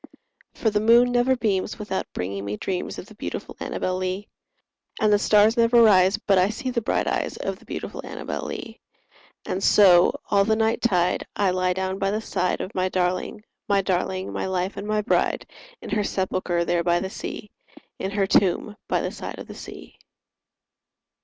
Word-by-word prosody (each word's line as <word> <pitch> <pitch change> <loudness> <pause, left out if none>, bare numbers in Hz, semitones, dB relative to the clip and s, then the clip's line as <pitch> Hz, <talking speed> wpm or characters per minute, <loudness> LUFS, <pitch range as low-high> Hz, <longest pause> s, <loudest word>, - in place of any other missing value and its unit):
For 220 - 0
the 210 - +1
moon 235 +3 +5
never 245 +2 +3
beams 210 -5 -1
without 210 -3 -4
bringing 100 +2 -4
me 100 +1 -4
dreams 185 - -3
Of - - -7
the 215 - -15
beautiful 210 - -6
Annabel 185 0 -2
Lee; 185 +2 -3 0.7
And 215 -1 +3
the 205 - +4
stars 210 +2 +4
never 235 0 +4
rise 195 -3 +5
but 195 -3 +2
I 185 +2 +3
see 255 +4 -4
the 240 -1 -1
bright - - 0
eyes - - -2
Of - - -4
the - - -19
beautiful - - -6
Annabel - - -5
Lee; - - -7 0.7
And 190 - -3
so, 180 -4 +6
all 200 -1 +5
the 220 +2 +2
night 220 +1 +1
tide, 180 -7 +1
I 200 -2 +2
lie 185 0 +1
down 190 +1 -3
by 195 - +1
the 210 +2 -1
side 180 -4 -1
Of 190 - -6
my 185 0 0
darling, 185 +3 -1 0.3
my 200 -1 +3
darling, 185 0 -1
my - - -2
life 185 +1 -2
and 200 +1 -6
my 215 0 +1
bride, 230 - +1 0.4
In - - -7
her 210 - +1
sepulchre 185 -3 -1
there 170 0 +1
by 175 0 +2
the 190 +1 -4
sea— 210 -1 -7 0.5
In 190 - -2
her 200 0 0
tomb 195 +2 +1
by - - +1
the - - -3
side - - -7
of - - -8
the - - -10
sea. - - -11
195 Hz, 190 wpm, -24 LUFS, 185-215 Hz, 0.7 s, so